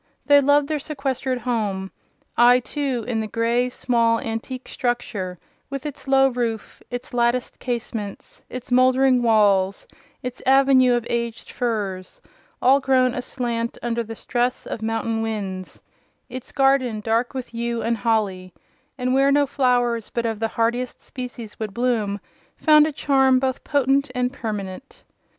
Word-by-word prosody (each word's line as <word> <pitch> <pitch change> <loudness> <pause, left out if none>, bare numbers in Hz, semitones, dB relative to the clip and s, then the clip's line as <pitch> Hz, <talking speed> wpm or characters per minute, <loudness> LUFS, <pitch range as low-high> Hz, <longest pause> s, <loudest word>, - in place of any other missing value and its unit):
They 285 0 +6
loved 285 +1 +3
their 305 -1 -1
sequestered 275 -3 -2
home. 210 -6 -2 0.4
I, 245 +1 +6
too, 255 -3 -3
in 235 -3 -1
the 215 - -3
grey, 235 +3 +1
small, 230 -2 +1
antique 230 +3 -5
structure, 210 -7 -3 0.3
with 275 0 -5
its 275 -2 -7
low 270 0 +5
roof, 235 -4 -3
its 245 0 -6
latticed 240 +1 0
casements, 230 -4 -5
its 255 0 -8
mouldering 255 0 +4
walls, 200 -4 +3 0.4
its 250 0 -5
avenue 265 -1 +5
of 240 -1 -2
aged 235 -1 -3
firs—all 220 +4 -1
grown 260 -2 +2
aslant 240 -2 -3
under 235 -1 -1
the 225 0 -7
stress 245 +2 -1
of 225 - -5
mountain 225 0 -1
winds; 195 -4 -5 0.5
its 255 -1 -7
garden, 270 -5 +2
dark 230 +4 0
with 255 -2 -6
yew 235 0 -2
and 230 0 0
holly—and 220 +5 -3
where 275 +1 +4
no 285 0 +4
flowers 245 -4 +1
but 235 -1 -2
of 225 -2 -2
the 225 - 0
hardiest 235 +2 -1
species 245 -4 -8
would 215 -3 -5
bloom—found 245 +6 +1
a - - -2
charm 270 -2 +3
both 260 0 -1
potent 280 0 +2
and 250 +1 0
permanent. 215 -1 -6
245 Hz, 140 wpm, -23 LUFS, 225-260 Hz, 0.5 s, They